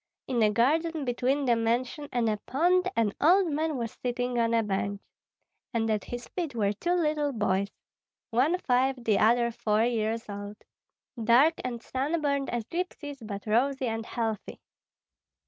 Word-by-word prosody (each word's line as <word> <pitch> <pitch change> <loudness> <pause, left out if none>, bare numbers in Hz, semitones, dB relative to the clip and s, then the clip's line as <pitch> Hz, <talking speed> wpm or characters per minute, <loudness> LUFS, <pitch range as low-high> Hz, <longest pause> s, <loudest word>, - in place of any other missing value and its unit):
In 245 -3 0
a 215 - +5
garden 300 +8 +1
between 260 +3 0
the 240 -2 +4
mansion 245 +6 -1
and 240 -2 +1
a 215 -1 +1
pond 360 +6 +2
an 220 -3 +1
old 355 +2 +5
man 310 0 -1
was 230 -2 -3
sitting 245 0 -1
on 230 0 +2
a 230 -1 +3
bench; 200 0 -2 0.8
and 225 -1 +1
at 210 -3 -1
his 245 0 -6
feet 330 -8 -4
were 205 -3 +1
two 345 - -1
little 300 -4 +1
boys, 200 -4 0 0.6
one 270 +10 +3
five, 260 -4 +2
the 215 -3 +2
other 235 +2 +4
four 215 -1 +1
years 225 -1 -1
old, 205 0 -7 0.7
dark 250 +8 +5
and 240 -2 -4
sunburned 280 0 -1
as 240 -1 -2
gypsies, 315 -3 -4
but 200 -2 -6
rosy 260 +5 +1
and 225 -1 -3
healthy. 225 -3 -3
245 Hz, 160 wpm, -28 LUFS, 225-285 Hz, 0.8 s, a